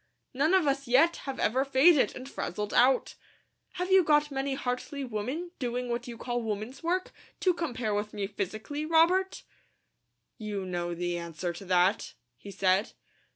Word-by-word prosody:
None 305 +8 +3
of 370 -4 +3
us 275 -1 0
yet 300 +8 +4
have 270 - -3
ever 255 +5 +2
faded, 275 +3 +4
and 255 +1 -8
frazzled 210 -5 -4
out. 255 +2 +3 0.6
Have 360 +1 -3
you 380 -1 +7
got 295 -1 +3
many 270 0 -2
Hartley 260 +2 -3
women, 260 +9 -4
doing 245 -1 -2
what 240 +1 -3
you 235 -1 -7
call 240 +1 -3
women's 220 +4 -5
work, 360 +2 -1 0.3
to 365 - +3
compare 250 -10 -2
with 205 +1 -2
me 205 -1 -3
physically, 215 +9 -4
Robert?" 335 +4 +2 1.0
"You 205 -3 -4
know 175 -1 -3
the 175 0 -2
answer 170 +1 -4
to 195 - -10
that," 185 +3 +2 0.2
he 200 - -12
said. 190 +1 +1
250 Hz, 160 wpm, -29 LUFS, 205-295 Hz, 1.0 s, you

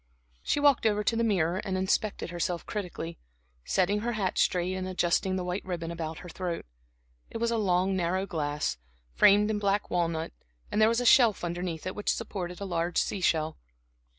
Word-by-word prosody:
She - - 0
walked 285 -5 +4
over 210 -1 +1
to 230 - +1
the 230 - +1
mirror 180 -6 +1
and 190 -3 -2
inspected 190 0 -1
herself 175 0 -2
critically, 175 -4 -5 0.4
setting 195 +2 +1
her 240 +3 -2
hat 195 -4 -1
straight 180 +1 +1
and 185 0 -3
adjusting 185 +1 +1
the 185 - -2
white 180 +2 -3
ribbon 170 -3 -4
about 160 -1 -5
her - - -7
throat. 175 0 -4 0.6
It - - -5
was 235 0 0
a 230 - +1
long 190 -1 +2
narrow 185 +1 0
glass, 150 - -2 0.4
framed 205 - +5
in 210 - -1
black 200 0 0
walnut, 165 -2 -1 0.4
and 215 - +1
there 215 - +6
was 230 +1 +1
a - - -2
shelf 230 -6 +5
underneath 175 -1 -3
it, 185 - -3
which 205 - -3
supported 180 -6 -4
a 200 - -4
large 170 -2 -1
sea 195 - 0
shell. 160 - +1
185 Hz, 190 wpm, -28 LUFS, 175-210 Hz, 0.6 s, there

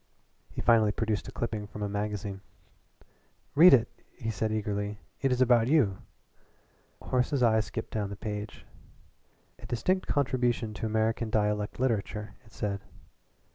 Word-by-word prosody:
He - - -6
finally 110 -3 +4
produced 110 -1 -2
a - - -6
clipping 110 -3 -3
from 105 0 -7
a - - 0
magazine. 100 -1 -3 1.1
"Read 170 +5 +9
it!" 120 -4 +6 0.3
he 115 -1 -3
said 110 +2 -1
eagerly. 105 -1 -2 0.2
"It 135 - +2
has 125 0 +1
about 120 -2 +5
you 125 -10 +3 1.0
too." - - -15
Horace's 125 +1 +1
eye 110 -2 +5
skipped 110 +1 -4
down 105 -2 -1
the 100 - -6
page. 105 +1 -6 0.9
"A - - -10
distinct 185 +10 0
contribution 125 -5 0
to 110 - -3
American 110 +1 0
dialect 105 0 0
literature," 110 -4 -1
it 110 - -21
said. 100 -2 -3
110 Hz, 145 wpm, -29 LUFS, 105-120 Hz, 1.1 s, Read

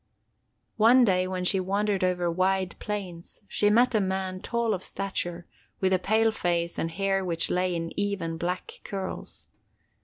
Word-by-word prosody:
One 240 +3 +6
day, 185 -3 +2
when 185 -1 -3
she 190 +1 +3
wandered 200 +1 0
over 180 -1 +1
wide 185 +1 +1
plains, 190 -5 -6
she 205 +2 +2
met 240 +4 +4
a 215 - +3
man 190 -1 -2
tall 235 -1 0
of 185 -1 -4
stature, 175 -3 -4 0.3
with 190 0 +2
a 185 - +3
pale 220 +4 +3
face 170 -4 -1
and 165 - -1
hair 195 +3 0
which 170 -2 0
lay 180 0 +1
in 165 0 -3
even, 195 -5 -1
black 180 +2 -4
curls. 195 -2 -6
190 Hz, 160 wpm, -27 LUFS, 180-205 Hz, 0.3 s, One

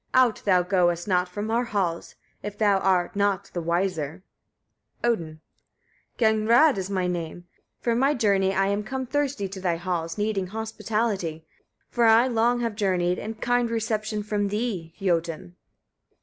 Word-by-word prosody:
Out 255 -3 +4
thou 185 -3 +4
goest 175 -1 +1
not 180 -2 +1
from 210 +4 -4
our 240 +2 +1
halls, 185 -7 -2 0.3
if 205 0 -6
thou 205 -3 +3
art 185 -2 +1
not 200 -2 0
the 175 - -2
wiser. 170 -1 -1 0.8
Odin. 165 -10 -1 0.7
8. - - -41
Gagnrâd 225 +5 +4
is 190 0 -3
my 190 -2 0
name, 175 -1 -4 0.4
from 235 0 +1
my 275 +3 +3
journey 200 -5 +2
I 195 0 +1
am 200 +1 0
come 260 +4 -4
thirsty 270 -6 -1
to 190 0 -8
thy 175 -2 +1
halls, 165 -2 -3
needing 205 -3 -1
hospitality, 210 -5 -2 0.5
for 240 -1 +2
I 225 +2 +6
long 240 0 +2
have 230 -2 -1
journeyed 180 -4 +1
and 220 +1 -6
kind 245 -1 +1
reception 215 -2 -2
from 205 -1 -1
thee, 200 -6 -3
Jötun! 165 - -1
200 Hz, 155 wpm, -25 LUFS, 180-225 Hz, 0.8 s, I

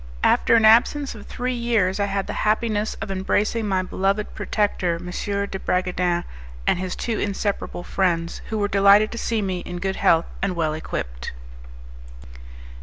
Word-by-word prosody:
After - - +4
an 225 -1 +5
absence 255 +6 +4
of 215 -3 -11
three 255 +1 -3
years 230 -6 +1
I 200 - +2
had 195 -1 -2
the - - -5
happiness 215 0 0
of 195 - -4
embracing 205 +3 0
my 190 -2 +1
beloved 195 +3 -1
protector, 195 -5 0
M. 170 +2 -8
de 200 +1 -3
Bragadin, 180 -1 0 0.4
and - - +2
his 185 -1 -3
two 230 -2 -2
inseparable 200 -3 -2
friends, 170 -3 -1
who 220 - -2
were 205 -1 +1
delighted 200 +2 +5
to 235 - -5
see 225 -2 -1
me 185 -2 -2
in 175 0 -6
good 190 +2 -2
health 165 0 +4 0.2
and 195 -2 0
well 160 -2 0
equipped. - - -5
195 Hz, 165 wpm, -23 LUFS, 180-215 Hz, 0.4 s, an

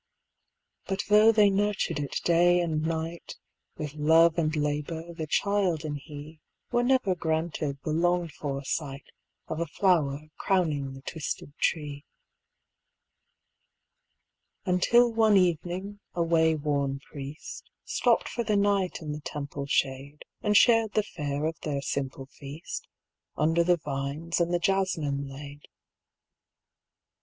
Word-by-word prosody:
But 195 0 -1
though 210 +2 +7
they 210 -2 +5
nurtured 205 -6 0
it 145 -1 -3
day 175 +1 +4
and 160 -3 0
night. 165 +1 -3 0.4
With 150 -2 -5
love 160 +2 +5
and 155 -1 0
labour, 150 +3 -2
the 160 -2 -5
child 185 -3 +1
and 145 -1 -3
he 150 +2 -10 0.3
Were 240 - +3
never 250 -6 +2
granted 160 -4 -2
the 155 - -2
longed 175 +1 +1
for 140 -2 -4
sight 140 -2 -3 0.4
Of 160 - -4
a 170 - -1
flower 155 -4 +1
crowning 150 -8 0
the 135 - -12
twisted 145 -2 -5
tree. 145 -3 -1 2.6
Until 230 +6 +4
one 220 -2 +5
evening 180 +3 0 0.2
a 170 - +2
wayworn 150 -4 +1
Priest 150 - -9 0.2
Stopped - - +2
for 235 - -3
the 210 -2 +1
night 200 -4 +1
in 150 - -4
the 150 +1 -5
Temple 140 -2 -5
shade 140 +1 -1 0.2
And 210 -1 +3
shared 225 -2 +5
the 215 - +2
fare 145 -6 -3
of 160 +1 -3
their 140 -2 -3
simple 135 -1 -3
feast 140 +3 -8 0.5
Under 165 +2 +3
the 175 0 +3
vines 145 +3 -3
and 170 0 +1
the 175 - +3
jasmin 165 -7 0
laid. 145 +1 -10
160 Hz, 130 wpm, -28 LUFS, 145-180 Hz, 2.6 s, though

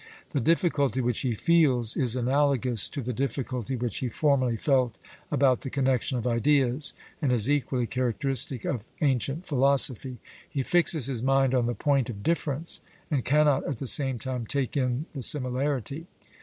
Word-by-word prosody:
The 140 - -1
difficulty 145 - +1
which 125 -2 0
he 125 -4 -1
feels 130 -7 +2
is 125 -3 +1
analogous 130 -3 +1
to 140 -3 -6
the 125 +2 -4
difficulty 130 -1 -3
which 120 -3 -3
he 130 - -3
formerly 130 -3 +1
felt 130 -3 0 0.3
about 135 -3 +2
the 135 - -5
connexion 130 -1 0
of 120 - -4
ideas, 130 +3 +1 0.3
and 140 -4 +1
is 120 -2 +3
equally 135 -3 0
characteristic 130 +1 0
of 120 -7 -3 0.2
ancient 140 - 0
philosophy: 135 -2 +1 0.3
he 135 - -3
fixes 165 -3 +3
his 125 -4 -3
mind 135 0 +2
on 125 -2 +1
the 120 - -2
point 140 -4 0
of 100 -4 -7
difference, 160 -1 -2 0.3
and 140 -5 0
cannot 145 +1 +2
at 140 - -3
the 135 - -6
same 135 0 +4
time 125 -1 -5
take 140 +1 -1
in 130 +1 -1
the 140 - -6
similarity. 135 +3 0
130 Hz, 165 wpm, -26 LUFS, 125-140 Hz, 0.3 s, same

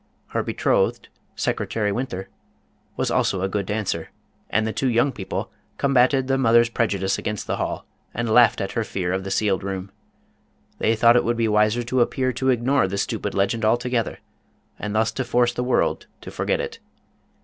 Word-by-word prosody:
Her - - -1
betrothed, - - 0 0.3
Secretary 105 -2 -1
Winther, 100 -4 -4 0.7
was - - 0
also 95 -1 +1
a - - +2
good 100 0 -2
dancer, 100 -6 -2 0.4
and 110 0 +1
the 110 - -2
two 135 - 0
young 120 +4 +2
peo 95 - -8
ple - - -3 0.3
combated 135 -1 +3
the 135 0 +1
mother's. 120 -1 +4
prejudice 100 -5 0
against 105 -1 -3
the - - -2
hall - - -3 0.3
and 120 +1 -3
laughed 115 0 +5
at 95 - -3
her 115 - -1
fear 90 -4 -2
of 95 0 -2
the 95 - -5
sealed 100 -2 +1
room. 95 0 -5 0.9
They 115 - +2
thought 115 +2 +5
it - - +3
would 120 +1 0
be 115 -1 +2
wiser 105 +2 +2
to 125 +1 0
appear 130 +1 +1
to 130 +2 0
ignore 125 -2 +2
the 100 +1 -3
stupid - - -2
legend 100 +4 0
alto 120 +3 +2
gether, 120 -2 -1 0.6
and 105 0 -4
thus 110 +1 +2
to 130 - -2
force 120 -1 +2
the 125 - -2
world 125 - 0
to - - -9
forget - - -1
it. 465 -2 -5
115 Hz, 190 wpm, -23 LUFS, 100-125 Hz, 0.9 s, laughed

